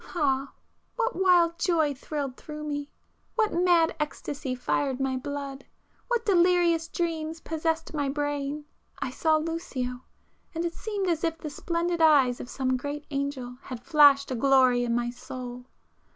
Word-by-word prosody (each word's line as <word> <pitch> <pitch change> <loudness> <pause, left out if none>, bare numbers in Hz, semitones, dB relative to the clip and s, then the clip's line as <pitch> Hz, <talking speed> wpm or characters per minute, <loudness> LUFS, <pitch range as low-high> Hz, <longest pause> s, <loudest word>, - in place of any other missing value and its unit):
Ah, 275 -4 +1 0.4
what 475 0 0
wild 345 -2 +4
joy 325 -5 +2
thrilled 275 -1 -4
through 300 +1 -8
me! 290 -1 -4 0.5
what 440 -2 +2
mad 345 -1 +3
ecstasy 285 -2 -3
fired 265 +1 -1
my 270 -1 0
blood!—what 285 - -5
delirious 350 -3 +3
dreams 325 -2 -2
possessed 320 0 -2
my 290 -3 0
brain!—I 290 -1 -4
saw 315 +4 +2
Lucio,—and 310 0 -5
it 340 - -2
seemed 410 -2 -3
as 335 -2 0
if 325 -1 0
the 305 -2 -6
splendid 340 +2 -1
eyes 280 -6 +5
of 245 - -7
some 260 -1 0
great 285 +3 -5
angel 275 -3 -3
had 245 -2 -8
flashed 285 -2 +5
a - - 0
glory 255 -1 +4
in 235 -1 0
my 240 0 0
soul! 250 0 -8
295 Hz, 140 wpm, -27 LUFS, 270-335 Hz, 0.5 s, eyes